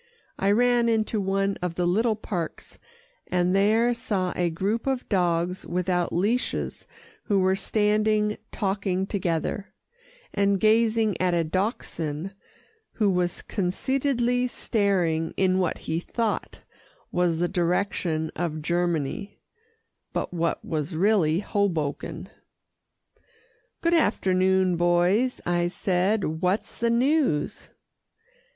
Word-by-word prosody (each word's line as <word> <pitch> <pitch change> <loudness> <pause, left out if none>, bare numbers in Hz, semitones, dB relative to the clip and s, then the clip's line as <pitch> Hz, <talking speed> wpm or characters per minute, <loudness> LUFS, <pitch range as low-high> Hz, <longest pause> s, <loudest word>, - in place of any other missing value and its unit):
I 195 - +2
ran 240 +2 +3
into 220 -1 +1
one 195 +1 0
of 180 -2 -2
the 180 - 0
little 215 +6 +2
parks, 180 -6 -6 0.5
and 180 +1 +1
there 220 +5 +3
saw 205 -7 -2
a 175 -1 +1
group 200 +9 -2
of 265 -2 -1
dogs 180 -1 0
without 180 0 -1
leashes 210 +8 -1 0.4
who 205 - +2
were 190 0 +3
standing 210 +1 +1
talking 195 -2 -1
together, 190 +1 -2 0.6
and 200 -1 +2
gazing 220 -1 +2
at 180 -1 +2
a 170 - +2
Dachshund 170 - -3 0.6
who 210 -3 +2
was 180 -1 -1
conceitedly 245 +5 0
staring 180 -9 0
in 185 -1 +2
what 180 -3 0
he 160 +1 -3
thought 225 +4 -3 0.5
was 175 -2 +1
the 175 +2 +1
direction 175 -3 -1
of 155 -2 -3
Germany, 175 +3 -1 0.7
but - - -3
what 170 -1 -1
was 155 +1 -3
really 180 -3 +3
Hoboken. 175 -9 -2 1.5
"Good 335 0 +2
afternoon, 190 - +2
boys," 175 +8 +2
I 175 0 +1
said, 180 -2 0
"what's 185 +3 0
the 235 - 0
news?" 250 - +1
190 Hz, 110 wpm, -25 LUFS, 175-215 Hz, 1.5 s, ran